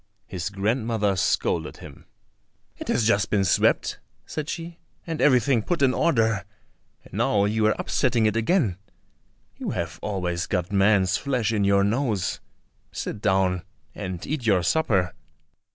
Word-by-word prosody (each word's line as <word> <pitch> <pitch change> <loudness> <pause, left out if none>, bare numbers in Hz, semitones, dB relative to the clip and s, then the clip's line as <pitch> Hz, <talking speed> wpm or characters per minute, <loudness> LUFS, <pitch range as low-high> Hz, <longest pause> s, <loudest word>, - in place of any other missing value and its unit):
His 90 -1 -4
grandmother 105 0 0
scolded 90 - 0
him. - - -13 0.7
"It - - -8
has 110 - +1
just 105 -2 +2
been 100 -2 +2
swept," - - +2 0.3
said 155 0 -5
she, 170 0 -6 0.3
"and 165 -2 -4
everything 125 -3 +4
put 165 +5 -1
in 130 -2 +4
order, 115 -11 +2 0.6
and - - -18
now 100 -1 +2
you 110 +1 +2
are 110 - +2
upsetting 120 -4 +1
it 105 0 +1
again; 115 - +1 0.8
you - - -4
have 85 0 -4
always 90 -4 -2
got 90 -2 -2
man's 100 -2 +3
flesh 125 -6 -1
in 105 -2 +1
your 100 0 +4
nose. 110 -2 0 0.5
Sit 105 - -5
down 95 -2 +2 0.3
and 90 -3 -6
eat 150 -3 -3
your 95 -4 +3
supper." 95 - +1
105 Hz, 145 wpm, -25 LUFS, 95-125 Hz, 0.8 s, everything